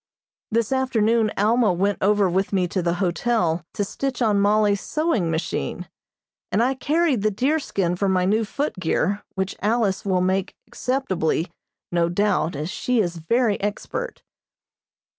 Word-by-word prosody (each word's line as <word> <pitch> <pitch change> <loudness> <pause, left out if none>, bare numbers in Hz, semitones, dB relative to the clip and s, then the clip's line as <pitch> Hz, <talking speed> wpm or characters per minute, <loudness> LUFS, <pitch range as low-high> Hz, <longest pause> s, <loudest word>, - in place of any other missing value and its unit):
This 230 0 0
afternoon 230 -4 +2
Alma 220 +1 +3
went 195 +3 0
over 205 0 +3
with 190 +3 0
me 185 -3 +1
to 185 - -1
the 170 0 0
hotel 175 -1 0
to 205 - 0
stitch 265 +6 -3
on 215 -4 +2
Mollie's 205 0 +3
sewing 305 - 0
machine, 160 - -3 0.6
and 215 +4 +2
I 260 +2 +2
carried 295 -2 +1
the 215 - +2
deerskin 210 - 0
for 195 +2 0
my 185 -1 +2
new 215 +4 +2
footgear 205 - -1
which 190 0 -2
Alice 215 -2 +1
will 185 -2 +1
make 190 +1 0
acceptably, 190 - -1 0.4
no 170 -1 +2
doubt, 180 -3 +1
as 155 +5 -4
she 250 +2 0
is 175 -4 0
very 220 +6 +1
expert. 475 - -4
205 Hz, 145 wpm, -23 LUFS, 180-235 Hz, 0.6 s, Alma